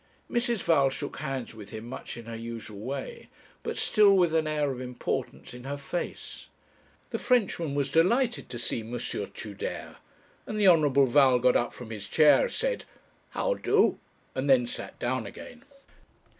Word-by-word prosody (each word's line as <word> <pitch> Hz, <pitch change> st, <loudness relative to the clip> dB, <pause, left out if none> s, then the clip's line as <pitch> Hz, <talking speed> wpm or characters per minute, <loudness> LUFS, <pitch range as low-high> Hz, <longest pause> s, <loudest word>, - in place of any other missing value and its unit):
Mrs. 240 Hz, -3 st, 0 dB
Val 140 Hz, -5 st, +4 dB
shook 140 Hz, +2 st, -5 dB
hands 135 Hz, -5 st, -4 dB
with 105 Hz, -2 st, -11 dB
him 110 Hz, +1 st, -7 dB
much 120 Hz, -, -7 dB
in 120 Hz, -, -9 dB
her 115 Hz, 0 st, -6 dB
usual 115 Hz, -2 st, -7 dB
way, 140 Hz, -, -6 dB, 0.3 s
but -, -, -4 dB
still 205 Hz, -2 st, +5 dB
with 175 Hz, -3 st, +3 dB
an 160 Hz, -1 st, +2 dB
air 150 Hz, -2 st, 0 dB
of 130 Hz, -1 st, -6 dB
importance 125 Hz, -1 st, -4 dB
in 125 Hz, 0 st, -10 dB
her 140 Hz, +1 st, -3 dB
face; 145 Hz, +5 st, -5 dB, 0.6 s
the -, -, -2 dB
Frenchman 185 Hz, -, +1 dB
was 140 Hz, -1 st, 0 dB
delighted 235 Hz, -, +2 dB
to 120 Hz, -, -5 dB
see 120 Hz, 0 st, -3 dB
M. 110 Hz, +1 st, -8 dB
Tudere, 105 Hz, -2 st, -5 dB, 0.5 s
and 215 Hz, -, -3 dB
the 205 Hz, -, +5 dB
Honourable 145 Hz, -6 st, +5 dB
Val 130 Hz, 0 st, +5 dB
got 125 Hz, +1 st, +3 dB
up 120 Hz, -, +2 dB
from 120 Hz, -2 st, -10 dB
his 100 Hz, -2 st, -6 dB
chair, 155 Hz, -, +5 dB
said -, -, -2 dB, 0.4 s
'How -, -, 0 dB
do?' -, -, +2 dB, 0.3 s
and 135 Hz, +2 st, -2 dB
then 130 Hz, -2 st, +5 dB
sat 120 Hz, -, -6 dB
down 120 Hz, -3 st, -2 dB
again. 245 Hz, -, -11 dB
140 Hz, 170 wpm, -28 LUFS, 120-175 Hz, 0.6 s, still